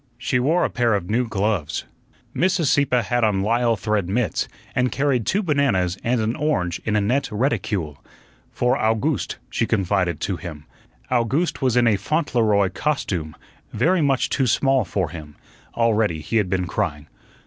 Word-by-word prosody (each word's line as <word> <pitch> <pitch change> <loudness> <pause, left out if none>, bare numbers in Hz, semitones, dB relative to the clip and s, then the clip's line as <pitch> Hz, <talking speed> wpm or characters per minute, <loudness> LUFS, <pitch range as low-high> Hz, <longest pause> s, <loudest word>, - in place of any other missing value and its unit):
She 125 +1 0
wore 160 +8 +2
a - - -1
pair 120 -3 +2
of 95 -1 -3
new 120 +2 +1
gloves. 100 -7 -1 0.5
Mrs. 180 -5 +2
Sieppe 130 -4 +2
had 120 -1 0
on 100 -3 +2
lisle 115 +2 +2
thread 105 -2 -1
mits, 110 +3 0 0.3
and 125 0 +1
carried 135 -5 0
two 205 +3 +1
bananas 135 - +1
and 120 +1 +1
an 110 +2 0
orange 90 - -1
in 105 - 0
a 105 - +3
net 125 +8 0
reticule. 105 - -2 0.5
"For 125 +1 +1
Owgooste," 110 - 0 0.2
she - - 0
confided 90 -4 0
to 95 - -2
him. 80 -3 -8 0.5
Owgooste 135 +8 0
was 130 -2 +2
in 120 - +4
a 110 -3 +3
Fauntleroy 110 - +1
"costume" 95 - -2 0.4
very 165 - +2
much 135 -3 +1
too 135 - +1
small 135 +2 +2
for 95 -6 -2
him. 75 -3 -9 0.4
Already 110 -8 +1
he 115 - -1
had 105 -4 +1
been 90 -1 0
crying. 75 -4 -2
115 Hz, 165 wpm, -22 LUFS, 95-130 Hz, 0.5 s, in